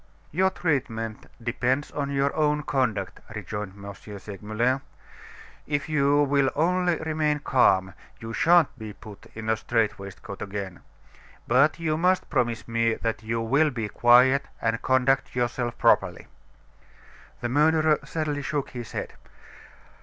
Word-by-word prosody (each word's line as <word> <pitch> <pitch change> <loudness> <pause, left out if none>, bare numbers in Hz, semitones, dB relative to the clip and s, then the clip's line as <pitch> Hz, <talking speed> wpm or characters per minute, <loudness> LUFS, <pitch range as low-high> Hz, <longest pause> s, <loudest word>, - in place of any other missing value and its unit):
"Your 190 +5 +3
treatment 130 - -2 0.2
depends 125 +4 -1
on 140 -1 -3
your 140 0 0
own 150 -1 +1
conduct," 115 -10 -1 0.2
rejoined 105 -1 -5
M. 100 - -6 0.2
Segmuller, 110 +6 -2 0.9
"If 145 +1 -1
you 145 -1 +3
will 140 -1 +2
only 180 +2 +2
remain 155 -2 0
calm, 95 -10 +2 0.3
you 115 0 -7
shan't 170 +3 +4
be 110 -1 -7
put 105 -1 -13
in 110 0 -6
a 110 - +3
strait 115 -1 0
waistcoat 100 +1 -9
again. 100 -2 -5 0.7
But 140 +7 +3
you 155 -2 0
must 180 +3 +1
promise 120 -2 0
me 115 -1 +1
that 115 -1 -3
you 115 +1 -2
will 140 +7 +3
be 115 -6 -4
quiet 125 +5 +5
and 115 0 -1
conduct 130 +1 +1
yourself 120 -1 -1
properly." - - +2 1.2
The 120 - -2
murderer 155 +3 +3
sadly 150 -3 -3
shook 145 0 -3
his 120 -3 -8
head. - - -4
130 Hz, 135 wpm, -26 LUFS, 115-150 Hz, 1.2 s, quiet